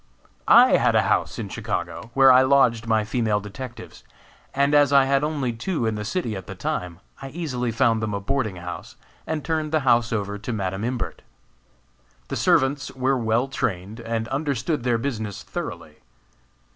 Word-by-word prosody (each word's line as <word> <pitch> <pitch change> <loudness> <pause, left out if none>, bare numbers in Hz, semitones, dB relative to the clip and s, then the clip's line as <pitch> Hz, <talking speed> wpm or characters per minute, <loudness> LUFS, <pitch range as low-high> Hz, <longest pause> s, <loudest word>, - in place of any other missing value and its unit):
I - - +7
had - - +2
a - - +4
house - - 0
in - - -4
Chicago, 110 - -4
where 135 -1 +7
I 130 0 +7
lodged 130 -4 +3
my 110 -1 +2
female 110 -1 0
detectives, 115 +4 -9 0.5
and 140 +1 +1
as 145 -2 +5
I 140 -1 +6
had 140 +1 +2
only 145 -5 -1
two 125 +3 -2
in 110 - 0
the 105 0 -4
city 115 - -2
at 95 -2 -8
the - - -7
time, 90 -1 -4 0.2
I 135 - -6
easily 130 -7 -3
found 115 -1 +2
them 105 -2 -2
a - - -2
boarding 110 -1 -2
house, 90 0 -8 0.3
and 155 -2 -3
turned 155 -2 -1
the 155 -1 +2
house 120 -3 +3
over 105 -2 -2
to 105 +4 -5
Madam 95 -2 -3
Imbert. 125 +1 -3 1.1
The - - -3
servants 145 -6 +2
were 130 +1 +1
well 115 +1 +1
trained, 105 -4 -3
and 115 -1 -3
understood 140 0 -1
their 120 -1 +1
business 110 -5 -4
thoroughly. - - -7
120 Hz, 175 wpm, -23 LUFS, 110-140 Hz, 1.1 s, I